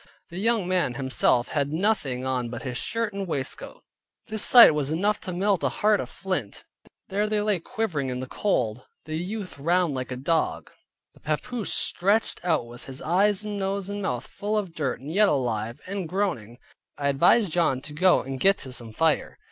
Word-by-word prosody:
The 175 Hz, -, -7 dB
young 220 Hz, -3 st, +1 dB
man 180 Hz, -9 st, +1 dB
himself 130 Hz, -2 st, +1 dB
had 145 Hz, -1 st, -1 dB
nothing 155 Hz, -, 0 dB
on 125 Hz, -2 st, -1 dB
but 120 Hz, 0 st, -7 dB
his 125 Hz, -3 st, -4 dB
shirt 230 Hz, -, -2 dB
and 195 Hz, -1 st, -4 dB
waistcoat. 140 Hz, -5 st, -5 dB, 0.5 s
This 220 Hz, -1 st, 0 dB
sight 240 Hz, -10 st, +9 dB
was 150 Hz, -1 st, -1 dB
enough 200 Hz, +6 st, 0 dB
to 185 Hz, -, -5 dB
melt 195 Hz, +1 st, +1 dB
a -, -, +2 dB
heart 210 Hz, -1 st, +2 dB
of -, -, -4 dB
flint. 185 Hz, -, -4 dB, 0.5 s
There 205 Hz, +2 st, 0 dB
they 210 Hz, 0 st, 0 dB
lay 205 Hz, -3 st, +1 dB
quivering 175 Hz, -, -2 dB
in 125 Hz, 0 st, -3 dB
the 130 Hz, -, -4 dB
cold, 125 Hz, -, -1 dB, 0.2 s
the 155 Hz, +1 st, -4 dB
youth 185 Hz, 0 st, -5 dB
round 170 Hz, +1 st, +2 dB
like 130 Hz, -1 st, -4 dB
a 125 Hz, -, -3 dB
dog, 160 Hz, +5 st, -1 dB, 0.4 s
the -, -, -21 dB
papoose 205 Hz, +9 st, -3 dB
stretched 205 Hz, +3 st, +2 dB
out 160 Hz, -8 st, +1 dB
with 120 Hz, +1 st, -11 dB
his 135 Hz, +1 st, -6 dB
eyes 195 Hz, +5 st, +2 dB
and 210 Hz, -1 st, -4 dB
nose 195 Hz, 0 st, -2 dB
and 205 Hz, 0 st, -4 dB
mouth 125 Hz, -8 st, -2 dB
full 210 Hz, +1 st, -3 dB
of 190 Hz, -5 st, -3 dB
dirt, 145 Hz, -6 st, -2 dB
and 145 Hz, +4 st, -6 dB
yet 205 Hz, +1 st, +5 dB
alive, 120 Hz, -4 st, -1 dB
and 190 Hz, -3 st, -4 dB
groaning. 160 Hz, -, -2 dB, 0.4 s
I 140 Hz, -, -1 dB
advised 170 Hz, +8 st, +4 dB
John 160 Hz, -6 st, +1 dB
to 150 Hz, +2 st, -9 dB
go 180 Hz, +4 st, +4 dB
and 135 Hz, 0 st, -5 dB
get 195 Hz, +5 st, +4 dB
to 130 Hz, -, -8 dB
some 115 Hz, -2 st, -6 dB
fire. 160 Hz, +4 st, 0 dB
170 Hz, 195 wpm, -25 LUFS, 130-200 Hz, 0.5 s, sight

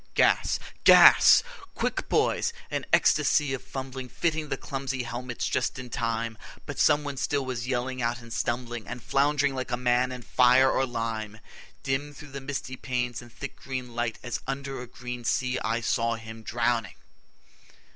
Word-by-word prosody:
Gas! -, -, +3 dB, 0.3 s
GAS! -, -, +8 dB, 0.3 s
Quick, -, -, -2 dB
boys! 465 Hz, -, +1 dB, 0.2 s
An -, -, -3 dB
ecstasy 145 Hz, -3 st, +3 dB
of 135 Hz, -, -3 dB
fumbling 130 Hz, -1 st, -6 dB
Fitting 160 Hz, -1 st, -1 dB
the -, -, -1 dB
clumsy 135 Hz, -2 st, -4 dB
helmets 120 Hz, +1 st, -4 dB
just 130 Hz, 0 st, -1 dB
in 125 Hz, -2 st, -8 dB
time, 115 Hz, -1 st, -2 dB, 0.3 s
But -, -, -6 dB
someone 145 Hz, -2 st, +2 dB
still 140 Hz, 0 st, 0 dB
was 125 Hz, -1 st, -4 dB
yelling 130 Hz, 0 st, -2 dB
out 120 Hz, 0 st, -1 dB
and 115 Hz, -1 st, -10 dB
stumbling 120 Hz, -1 st, -3 dB
And 120 Hz, +1 st, -7 dB
flound'ring 145 Hz, 0 st, +2 dB
like 130 Hz, -1 st, -4 dB
a 120 Hz, -, -1 dB
man 125 Hz, +1 st, +2 dB
in 125 Hz, -1 st, -7 dB
fire 125 Hz, +3 st, +5 dB
or 135 Hz, -, +1 dB
lime. 115 Hz, -3 st, -4 dB, 0.4 s
Dim 145 Hz, +2 st, -2 dB
through 150 Hz, 0 st, -12 dB
the 140 Hz, 0 st, -6 dB
misty 135 Hz, -1 st, -4 dB
panes 125 Hz, -2 st, -3 dB
and 120 Hz, -1 st, -14 dB
thick 140 Hz, +3 st, -7 dB
green 130 Hz, -2 st, -6 dB
light, 120 Hz, -1 st, -2 dB
As 120 Hz, -, -3 dB
under 135 Hz, -1 st, -4 dB
a 125 Hz, -, -8 dB
green 125 Hz, 0 st, -7 dB
sea, 125 Hz, +2 st, 0 dB
I 115 Hz, +1 st, -1 dB
saw 115 Hz, 0 st, +1 dB
him 110 Hz, 0 st, -9 dB
drowning. 115 Hz, -2 st, -1 dB
125 Hz, 165 wpm, -27 LUFS, 120-135 Hz, 0.4 s, GAS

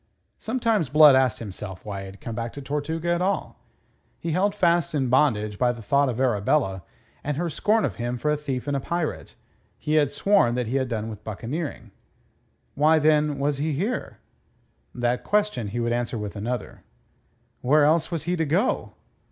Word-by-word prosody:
Sometimes 225 Hz, -, 0 dB
Blood 150 Hz, 0 st, +8 dB
asked 130 Hz, -3 st, +3 dB
himself 95 Hz, -3 st, -8 dB
why 100 Hz, -2 st, -5 dB
had 95 Hz, 0 st, -9 dB
he -, -, -18 dB
come 115 Hz, -, -6 dB
back 115 Hz, 0 st, -4 dB
to 140 Hz, -, -7 dB
Tortuga 155 Hz, +4 st, -3 dB
at 175 Hz, -, -1 dB
all. 195 Hz, +2 st, -1 dB, 0.6 s
Held 185 Hz, +5 st, +1 dB
fast 170 Hz, -5 st, +2 dB
in 135 Hz, -3 st, 0 dB
bondage 110 Hz, -6 st, +2 dB
by 125 Hz, -1 st, +3 dB
the 115 Hz, -2 st, -9 dB
thought 140 Hz, +5 st, +2 dB
of 120 Hz, -1 st, -3 dB
Arabella 105 Hz, -4 st, +1 dB, 0.4 s
and 145 Hz, -1 st, -2 dB
her 170 Hz, 0 st, -1 dB
scorn 215 Hz, +6 st, +2 dB
of -, -, -4 dB
him 120 Hz, +1 st, -2 dB
for 150 Hz, +5 st, 0 dB
a -, -, +2 dB
thief 140 Hz, -4 st, -4 dB
and 145 Hz, -, 0 dB
a -, -, +1 dB
pirate, 170 Hz, +3 st, -3 dB, 0.4 s
he 150 Hz, -, -3 dB
had 145 Hz, -, +1 dB
sworn 195 Hz, -13 st, +2 dB
that 125 Hz, -1 st, -1 dB
he 125 Hz, +5 st, -1 dB
had 130 Hz, -1 st, 0 dB
done 110 Hz, -2 st, -3 dB
with 110 Hz, -2 st, -8 dB
buccaneering. 115 Hz, -, -5 dB, 0.8 s
Why, 155 Hz, +3 st, +4 dB
then, 150 Hz, -1 st, +3 dB
was 140 Hz, 0 st, -1 dB
he 155 Hz, +1 st, 0 dB
here? 200 Hz, -, -3 dB, 0.8 s
That 120 Hz, 0 st, 0 dB
question 210 Hz, -, 0 dB
he 110 Hz, +4 st, -4 dB
would 120 Hz, 0 st, 0 dB
answer 120 Hz, 0 st, -2 dB
with 105 Hz, -1 st, -5 dB
another: 120 Hz, +4 st, -4 dB, 0.8 s
Where 145 Hz, +3 st, +4 dB
else 155 Hz, +2 st, +3 dB
was 165 Hz, -3 st, -3 dB
he 175 Hz, +2 st, -1 dB
to 165 Hz, -, +1 dB
go? 180 Hz, -, 0 dB
140 Hz, 185 wpm, -25 LUFS, 120-160 Hz, 0.8 s, Blood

